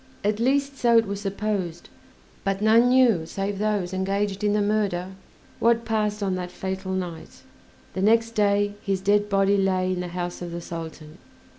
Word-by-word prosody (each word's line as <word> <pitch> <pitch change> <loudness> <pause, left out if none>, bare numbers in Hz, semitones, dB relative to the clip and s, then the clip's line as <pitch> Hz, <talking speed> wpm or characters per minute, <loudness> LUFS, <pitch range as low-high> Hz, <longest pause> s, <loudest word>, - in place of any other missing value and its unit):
At 210 +1 0
least 275 +3 +1
so 235 -1 +4
it 225 - +4
was 200 0 -4
supposed, 195 -4 -3 0.6
but 195 -1 -1
none 225 +3 +5
knew 240 -10 +4
save 195 +2 -3
those 205 -4 -1
engaged 195 +1 -1
in 205 -1 +2
the 210 - +2
murder 200 -4 0 0.5
what 230 0 +3
passed 210 -2 -1
on 190 -1 0
that 180 -1 -3
fatal 190 +1 -4
night; 180 -3 -6 0.5
the 190 - -3
next 225 +3 +3
day 205 -2 +2
his 195 -1 -1
dead 205 +2 +2
body 195 0 +3
lay 185 -1 +1
in 180 - -3
the 180 - -3
house 175 0 -5
of 175 -1 -5
the 170 - -4
Sultan. 165 -1 -8
200 Hz, 175 wpm, -25 LUFS, 185-215 Hz, 0.6 s, none